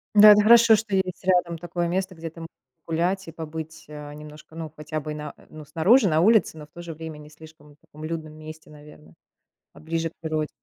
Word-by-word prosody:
Да, 210 Hz, 0 st, +10 dB
это 210 Hz, 0 st, +7 dB
хорошо, 230 Hz, +1 st, +7 dB
что 210 Hz, -1 st, -2 dB
есть 190 Hz, -1 st, -2 dB
рядом 180 Hz, -2 st, +2 dB
такое 175 Hz, +1 st, -3 dB
место, 185 Hz, +1 st, -2 dB
где 165 Hz, 0 st, -7 dB
ты 165 Hz, -, -14 dB
можешь 165 Hz, -, -8 dB, 0.4 s
погулять 175 Hz, +4 st, -1 dB
и -, -, -7 dB
побыть, 160 Hz, 0 st, -8 dB
а, 150 Hz, -1 st, -9 dB
немножко, 150 Hz, +1 st, -12 dB
ну 160 Hz, -2 st, -6 dB
хотя 155 Hz, 0 st, -5 dB
бы 155 Hz, 0 st, -6 dB
на 150 Hz, 0 st, -7 dB, 0.2 s
ну, 155 Hz, -1 st, -11 dB
снаружи, 190 Hz, -, +4 dB
на 160 Hz, -2 st, +2 dB
улице, 215 Hz, -4 st, +3 dB
но, 150 Hz, -, -9 dB
в -, -, -27 dB
то 175 Hz, -, -10 dB
же 170 Hz, -1 st, -7 dB
время, 160 Hz, 0 st, -8 dB
не 150 Hz, 0 st, -13 dB
слишком 150 Hz, -1 st, -16 dB
таком 155 Hz, 0 st, -15 dB
людном 160 Hz, -1 st, -5 dB
месте, 155 Hz, 0 st, -11 dB
наверно, 150 Hz, -, -16 dB, 0.6 s
а -, -, -15 dB
ближе 165 Hz, +1 st, -2 dB
к -, -, -28 dB
природе. 155 Hz, -2 st, -2 dB
160 Hz, 220 wpm, -24 LUFS, 155-180 Hz, 0.6 s, Да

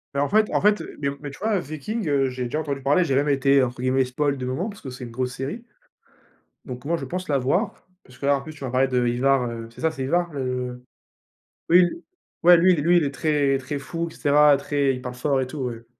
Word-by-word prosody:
Mais 140 Hz, -, +1 dB
en 145 Hz, -, 0 dB
fait 215 Hz, +1 st, +3 dB
en -, -, +2 dB
fait, 210 Hz, +1 st, +3 dB, 0.2 s
mais 140 Hz, -1 st, 0 dB
mais 145 Hz, -2 st, -6 dB
tu -, -, -13 dB
vois, 215 Hz, +1 st, 0 dB
heu, -, -, 0 dB
Viking, 175 Hz, +7 st, -5 dB
heu, 135 Hz, -2 st, +2 dB
j'ai 125 Hz, 0 st, -5 dB
déjà 150 Hz, +6 st, -2 dB
entendu 140 Hz, -3 st, -3 dB
parler, 145 Hz, +7 st, +3 dB
j'ai 135 Hz, -5 st, 0 dB
même 145 Hz, +2 st, +2 dB
été, 135 Hz, 0 st, +4 dB
entre 125 Hz, 0 st, -3 dB
guillemets, 130 Hz, 0 st, +2 dB
«spoil» 140 Hz, +2 st, -1 dB
de 125 Hz, -, -4 dB
moments, 135 Hz, -, -2 dB
parce 205 Hz, 0 st, -11 dB
que 130 Hz, -, -7 dB
c'est 125 Hz, 0 st, -9 dB
une -, -, -9 dB
grosse 125 Hz, +1 st, -3 dB
série 140 Hz, -, -5 dB, 1.0 s
donc 125 Hz, 0 st, -8 dB
moi, 170 Hz, -, +1 dB
je -, -, -6 dB
pense 185 Hz, +1 st, -5 dB
la 140 Hz, -2 st, +2 dB
voir, 175 Hz, -, -1 dB, 0.2 s
parce 125 Hz, -, -18 dB
que -, -, -6 dB
là, 140 Hz, 0 st, +4 dB
en -, -, -6 dB
plus 155 Hz, +2 st, -9 dB
tu 145 Hz, -, -11 dB
m'as 130 Hz, -, -4 dB
parlé 130 Hz, +1 st, +3 dB
de 125 Hz, -1 st, +1 dB
Ivar, 125 Hz, +2 st, +2 dB
heu, 115 Hz, -1 st, -7 dB
c'est 120 Hz, -, -13 dB
ça, 160 Hz, 0 st, +2 dB
c'est 135 Hz, -4 st, -5 dB
Ivar, 175 Hz, +4 st, 0 dB
le 125 Hz, -2 st, -4 dB, 0.9 s
oui, 175 Hz, +1 st, +7 dB, 0.6 s
ouais, 175 Hz, 0 st, +9 dB
lui 180 Hz, +2 st, +5 dB
lui 170 Hz, +3 st, +3 dB
il 165 Hz, -, +3 dB
est 140 Hz, -, -1 dB
très, 140 Hz, -2 st, +1 dB
très 135 Hz, +2 st, -5 dB
fou 165 Hz, +5 st, -4 dB
et -, -, -14 dB
cetera, 145 Hz, -1 st, +5 dB
très, 140 Hz, -1 st, 0 dB
il 125 Hz, -, -6 dB
parle 125 Hz, 0 st, -6 dB
fort 135 Hz, +1 st, 0 dB
et 130 Hz, -, -2 dB
tout, 145 Hz, +2 st, -7 dB
ouais. 120 Hz, -3 st, -5 dB
140 Hz, 265 wpm, -23 LUFS, 130-155 Hz, 1.0 s, ouais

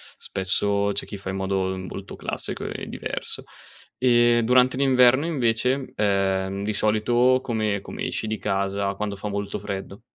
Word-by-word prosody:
spesso 100 Hz, +2 st, 0 dB
c'è 100 Hz, -, -3 dB
chi 100 Hz, -, -6 dB
fa 95 Hz, -1 st, -7 dB
in -, -, -4 dB
modo 95 Hz, -1 st, -1 dB
molto 95 Hz, +1 st, -7 dB
classico -, -, -5 dB
e -, -, -5 dB
diverso. -, -, -4 dB, 0.5 s
Ehm, 120 Hz, -1 st, +4 dB
durante 125 Hz, +1 st, +4 dB
l'inverno 130 Hz, 0 st, +5 dB
invece, 130 Hz, -3 st, 0 dB
ehm, 95 Hz, -1 st, +1 dB
di 105 Hz, +1 st, -1 dB
solito 120 Hz, +5 st, +3 dB
come 110 Hz, -4 st, -1 dB
come -, -, -7 dB
esci 110 Hz, -, -3 dB
di 110 Hz, 0 st, -2 dB
casa, 100 Hz, 0 st, -1 dB
quando 100 Hz, 0 st, -3 dB
fa 100 Hz, +2 st, -6 dB
molto 100 Hz, 0 st, -3 dB
freddo? 100 Hz, -1 st, -6 dB
105 Hz, 155 wpm, -24 LUFS, 100-120 Hz, 0.5 s, l'inverno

